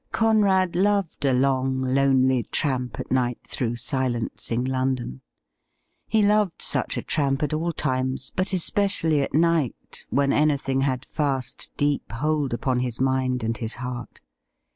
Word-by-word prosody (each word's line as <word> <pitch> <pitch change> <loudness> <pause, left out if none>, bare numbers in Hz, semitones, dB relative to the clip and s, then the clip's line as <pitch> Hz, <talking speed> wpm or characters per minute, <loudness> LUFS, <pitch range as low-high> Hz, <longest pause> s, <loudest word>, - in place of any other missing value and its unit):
Conrad 200 -5 +3
loved 195 -4 +1
a 135 - +4
long, 130 0 +1
lonely 130 -1 +3
tramp 125 -6 -1
at - - -6
night 125 -2 +1
through 120 -2 -2
silencing 120 -2 -2
London. 130 - -2 0.9
He 220 -1 +2
loved 205 -3 +2
such - - 0
a - - -3
tramp 140 -2 0
at 150 - -1
all 165 +3 0
times, 130 -3 -2
but 185 +1 0
especially 185 -4 +1
at 140 - -2
night, 165 -5 0
when 140 +3 +2
anything 140 -3 +1
had 135 -1 -1
fast, 140 -4 -2
deep 145 -1 0
hold 150 +2 0
upon 125 +1 0
his 125 -2 -3
mind 130 -2 +1
and 115 +1 -1
his 115 -1 -3
heart. 125 -1 -7
135 Hz, 140 wpm, -24 LUFS, 125-155 Hz, 0.9 s, a